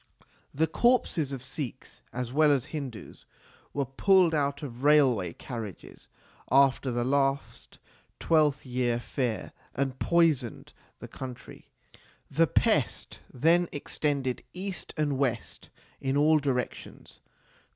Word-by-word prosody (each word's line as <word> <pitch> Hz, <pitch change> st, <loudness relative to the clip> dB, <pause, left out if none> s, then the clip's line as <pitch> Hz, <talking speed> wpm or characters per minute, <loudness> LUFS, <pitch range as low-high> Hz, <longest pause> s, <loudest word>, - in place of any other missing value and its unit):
The 160 Hz, +3 st, +1 dB
corpses 165 Hz, -, +1 dB
of 135 Hz, -2 st, -6 dB
Sikhs, 130 Hz, -1 st, -6 dB
as 125 Hz, 0 st, -4 dB
well 150 Hz, +1 st, +5 dB
as 135 Hz, -3 st, +1 dB
Hindus, 135 Hz, -7 st, -7 dB, 0.4 s
were 140 Hz, -1 st, -1 dB
pulled 180 Hz, +6 st, +3 dB
out 140 Hz, -1 st, 0 dB
of 125 Hz, -3 st, -7 dB
railway 130 Hz, -, +4 dB
carriages 115 Hz, -6 st, -8 dB, 0.4 s
after 135 Hz, 0 st, +4 dB
the 120 Hz, -1 st, -1 dB
last 135 Hz, +1 st, -1 dB, 0.4 s
twelfth 150 Hz, -3 st, +2 dB
year 125 Hz, -2 st, 0 dB
fair 120 Hz, -2 st, -3 dB, 0.2 s
and 135 Hz, -1 st, -2 dB
poisoned 155 Hz, -9 st, +1 dB, 0.2 s
the -, -, -9 dB
country. 130 Hz, -2 st, -10 dB, 0.6 s
The 165 Hz, +4 st, +3 dB
pest -, -, 0 dB
then 165 Hz, +6 st, +3 dB
extended 140 Hz, -3 st, -2 dB
east 185 Hz, -1 st, -5 dB
and 145 Hz, -3 st, 0 dB
west 135 Hz, -4 st, -2 dB, 0.3 s
in 135 Hz, +1 st, -1 dB
all 155 Hz, +2 st, +5 dB
directions. 135 Hz, -4 st, -4 dB
140 Hz, 115 wpm, -28 LUFS, 125-155 Hz, 0.6 s, well